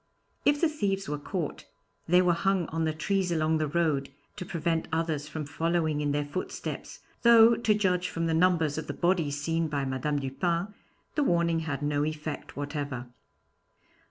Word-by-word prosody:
If 290 0 +4
the 330 - +4
thieves 200 -11 -1
were 150 0 -3
caught, 165 0 -4 0.4
they 180 +2 +5
were 175 -1 +4
hung 190 +1 +1
on 165 0 -1
the 160 - +1
trees 185 +3 0
along 160 -1 +1
the 155 - 0
road, 150 -3 0 0.3
to 195 - -4
prevent 165 -2 -1
others 160 -2 -1
from 155 0 -5
following 160 0 0
in 145 -1 0
their 145 0 0
footsteps, 165 +6 -5 0.2
though, 235 -1 +8
to 220 -2 +2
judge 180 -3 +1
from 165 0 -2
the 165 - +1
numbers 160 -3 +2
of - - -7
the - - -3
bodies 165 -5 +1
seen 165 +2 0
by 140 -2 -2
Madame 135 +3 -1
Dupin, 170 +8 -1 0.4
the 300 - +1
warning 170 -6 +2
had 145 -3 -3
no 145 0 +1
effect 155 -1 -5
whatever. 145 -4 -4
165 Hz, 175 wpm, -28 LUFS, 150-180 Hz, 0.4 s, though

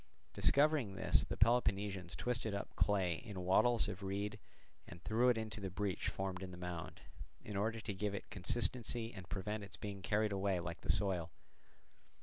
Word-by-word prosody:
Discovering 140 -8 +3
this - - +4
the - - -4
Peloponnesians 100 -6 +2
twisted 115 -4 -1
up 100 - -5
clay 95 -4 +2
in 105 -6 -6
wattles 115 +6 +4
of 100 -1 -5
reed 100 +2 -3 0.5
and 85 - -10
threw 120 +4 +3
it 120 - +3
into 110 -1 -4
the 95 - -3
breach 95 0 -2
formed 95 -1 -3
in 95 - -5
the 90 - -9
mound, 90 -2 -6 0.4
in 105 - -6
order 110 +3 0
to 105 - -4
give 100 +1 -2
it - - -7
consistency 115 +4 0
and 95 -2 -10
prevent 105 +3 -3
its 100 - -5
being 100 -2 -6
carried 105 +1 +1
away 95 -2 +1
like 85 - -5
the - - +2
soil. 90 -4 +2
100 Hz, 175 wpm, -37 LUFS, 95-110 Hz, 0.5 s, this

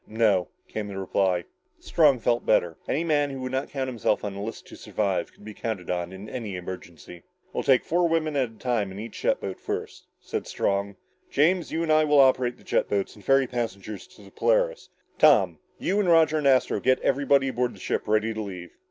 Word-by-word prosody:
"No," 105 -6 +2 0.2
came 105 -1 -4
the 100 -1 -7
reply. 95 -2 0 0.4
Strong 145 -7 +3
felt 120 +1 +1
better. 85 -6 +2
Any 155 - +1
man 145 -3 +1
who 135 -1 -6
would 130 0 -4
not 130 +1 -2
count 135 -2 -3
himself 115 -4 0
on 100 - -3
a 100 - -6
list 110 +2 -6
to - - -10
survive 100 -4 -2
could 105 - -18
be 110 - -8
counted 105 -5 -4
on 90 0 -2
in 95 +2 -9
any 110 -5 -5
emergency. 90 -1 -9 0.3
"We'll - - -1
take 130 -2 +3
four 175 0 +2
women 155 -2 0
at 130 -4 +1
a - - -17
time 110 -5 -1
in 95 - -9
each 110 +1 -7
jet - - +1
boat 95 -1 -6
first," - - -5
said - - -5
Strong. 100 0 -1 0.3
"James, 170 +5 +2
you 165 - -1
and 160 - 0
I 155 0 +4
will 145 -1 +4
operate 130 -2 +4
the - - -20
jet - - 0
boats 100 -1 -1
and 105 - -16
ferry 135 0 +4
the - - -13
passengers 110 -5 -4
to 105 - -18
the 95 - -15
Polaris. - - +1 0.3
Tom, - - +5 0.2
you 200 +3 0
and 195 -4 +1
Roger 160 -2 +5
and 145 - +1
Astro 130 -2 +3
get 130 0 +2
everybody 140 0 +2
aboard 125 -1 -1
the - - -15
ship - - -2
ready 110 +1 +1
to 110 - -4
leave." 90 -4 -7
115 Hz, 220 wpm, -26 LUFS, 100-140 Hz, 0.4 s, Tom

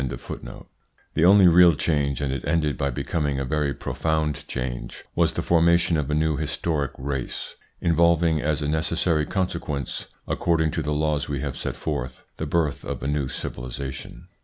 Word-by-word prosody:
1 65 - -1 1.1
The 80 - +3
only 95 0 +8
real 85 -1 +7
change, 70 -3 0
and 70 -2 -1
it 70 - -4
ended 75 -4 +1
by 70 - -1
becoming 70 +2 -1
a 70 - -1
very 75 +1 0
profound 75 +3 -2
change, - - -5
was 80 -1 +2
the 85 - -2
formation 85 0 +4
of 75 -2 -1
a 75 - +1
new 80 -1 +1
historic 75 -1 -1
race, 65 -2 -4 0.3
involving 85 -1 +3
as 75 0 0
a - - -1
necessary 80 0 +1
consequence 85 -8 -2 0.2
according 80 -2 +1
to 80 - -2
the 75 - -3
laws 75 -1 0
we 70 -2 -2
have 70 -3 -3
set - - -4
forth 65 +1 -4
the 80 - -3
birth 75 -2 0
of - - -5
a - - -1
new 75 -2 0
civilisation. 65 +1 -6
75 Hz, 170 wpm, -24 LUFS, 70-80 Hz, 1.1 s, only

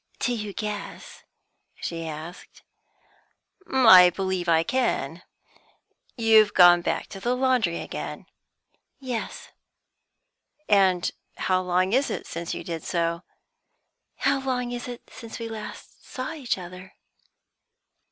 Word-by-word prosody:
"Do 245 - 0
you 210 -3 -4
guess?" 210 0 -6 0.5
she 165 -1 -5
asked. 160 +3 -9 1.1
"I 205 -9 +8
believe 190 -1 -2
I 165 -1 +4
can. 260 +9 -1 1.0
You 225 -1 +6
have 210 -1 +2
gone 175 -1 +7
back - - -2
to 195 - -8
the 240 +5 0
laundry 250 -9 +1
again?" - - -6 0.7
"Yes." 250 -4 -5 1.2
"And 190 -3 +3 0.3
how 185 -1 +1
long 185 +2 +1
is 270 +3 +2
it - - -4
since 170 0 -5
you - - -6
did 165 -2 -5
so?" 170 0 -1 1.0
"How 275 0 +1
long 250 -2 -2
is 245 0 -5
it 245 -1 -8
since 230 -1 -9
we 230 - -5
last 220 -1 -9
saw 255 +2 -6
each 270 -9 -2
other?" 185 +1 -10
200 Hz, 125 wpm, -25 LUFS, 175-245 Hz, 1.2 s, I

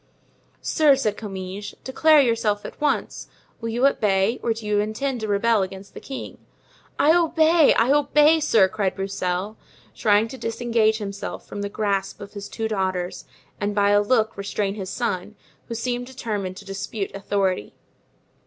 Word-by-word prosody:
"Sir," 300 -3 +4
said 215 -6 -1
Comminges, 195 -1 -6
"declare 310 +4 +4
yourself 230 -5 +1
at - - -9
once; 295 - -1 0.3
will 230 - -4
you 240 +4 +1
obey 210 -3 +2
or 235 - 0
do 225 -1 -4
you 210 0 +1
intend 235 +5 -2
to 215 - -2
rebel 210 +1 +2
against 190 +1 -6
the - - -8
king?" 270 - -8 0.6
"I 315 +3 +5
obey, 325 -2 +4
I 235 +4 +3
obey, 295 +2 +4
sir!" 225 -10 +4
cried 195 -1 -2
Broussel, 195 +1 -3 0.4
trying 210 0 +3
to 265 - -9
disengage 230 -1 +1
himself 200 -2 -6
from 205 - -7
the 200 - -3
grasp 200 -2 -2
of 200 - -10
his 205 -1 -7
two 225 -1 -3
daughters 185 -4 -2 0.3
and 205 0 -2
by 205 -1 +3
a 205 0 +5
look 220 0 +1
restrain 200 0 -2
his 195 -3 -6
son, 210 -3 -3 0.3
who 230 - -5
seemed 245 +1 -2
determined 210 -8 -4
to 200 - -11
dispute 195 +1 -5
authority. 195 - -1
215 Hz, 160 wpm, -23 LUFS, 195-245 Hz, 0.6 s, I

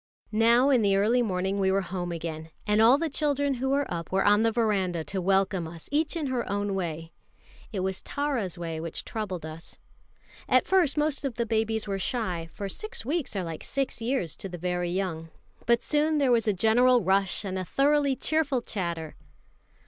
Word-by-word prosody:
Now 235 +5 +4
in 250 -4 +4
the 200 -2 +3
early 225 +5 +3
morning 190 -2 -1
we 190 -1 +2
were 195 +1 +2
home 175 -1 -4
again, 160 -1 -5 0.2
and 210 +1 +3
all 240 +5 +7
the 330 +2 -1
children 285 -1 0
who 265 +1 -2
were 280 +1 +2
up 170 -1 -5
were 195 +1 +2
on 205 +1 +5
the 225 0 +3
verandah 195 -7 0
to 190 +3 -3
welcome 190 -2 +1
us, 165 0 -11
each 305 +3 +1
in 320 -3 -2
her 255 -3 -2
own 205 0 -1
way. 165 -3 -4 0.6
It 200 -4 -2
was 190 0 -2
Tara's 265 - -2
way 165 -2 -4
which 165 0 -5
troubled 190 -7 -4
us. 160 +1 -9 0.7
At - - +4
first 350 -7 +3
most 300 -2 0
of 270 -4 -3
the 235 - -1
babies 220 -1 0
were 195 -1 -2
shy, 185 -7 -2
for 200 - -5
six 435 - -6
weeks 305 -6 -2
are 190 - -1
like 165 -2 -6
six 270 -3 -2
years 225 - -1
to 195 - -6
the 175 - -6
very 175 0 -2
young; 175 -3 -3 0.4
but 235 0 +3
soon 305 +1 +2
there 275 -3 +3
was 230 -2 +3
a - - +5
general 235 +5 +4
rush 195 +2 +1
and 190 -1 -3
a - - -2
thoroughly 280 +5 +2
cheerful 285 -4 0
chatter. 170 -6 -3
210 Hz, 200 wpm, -27 LUFS, 180-260 Hz, 0.7 s, all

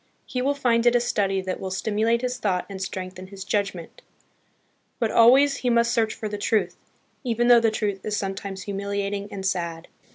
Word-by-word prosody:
He 250 - -3
will 280 +2 +1
find 240 -4 +2
it 240 - +5
a - - +5
study 200 -5 0
that 185 0 -4
will 190 - -4
stimulate 220 +5 0
his 250 0 -2
thought 185 -4 0
and 195 -1 -7
strengthen 185 0 -6
his 195 0 -9
judgment; 195 -5 -3 1.0
but 230 -3 0
always 270 +5 +6
he 250 - -1
must 235 0 +3
search 225 -2 +1
for 215 - -5
the 205 0 -5
truth, 215 +1 0 0.5
even 240 -1 +1
though 240 -1 +8
the 230 -1 +3
truth 205 -3 -2
is 210 -1 -2
sometimes 195 -1 -4
humiliating 200 0 -3
and 190 -1 -6
sad. 170 -3 -2
205 Hz, 190 wpm, -24 LUFS, 190-235 Hz, 1.0 s, though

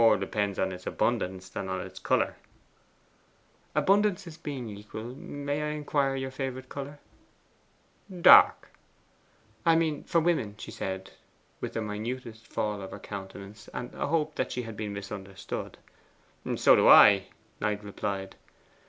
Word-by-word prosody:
'More 115 - +6
depends 100 0 -2
on 95 0 0
its 90 0 -8
abundance 95 0 -1
than 95 -1 -5
on 95 0 -2
its - - -8
colour.' - - +1 1.4
'Abundances 195 -4 +2
being 140 -6 -5
equal, 105 +3 -8
may 145 +1 -4
I 150 0 -1
inquire 145 -2 0
your 130 0 -3
favourite 130 -1 -5
colour?' 140 +1 -6 1.1
'Dark.' 180 -3 +7 0.9
'I 165 -1 +5
mean 160 -3 +1
for 170 - +2
women,' 155 -11 0
she - - -8
said, 95 0 -5 0.5
with - - -5
the 115 - -2
minutest 110 +2 -5
fall 105 -2 -2
of 95 - -7
countenance, 100 +1 -8
and 125 0 -5
a - - -2
hope 155 0 0
that - - -2
she 125 - -3
had 115 -2 -7
been 105 0 -4
misunderstood. 100 -1 -6 0.8
'So - - +6
do - - +4
I,' - - +9 0.3
Knight 105 0 -1
replied. 100 -1 -4
115 Hz, 140 wpm, -29 LUFS, 100-145 Hz, 1.4 s, I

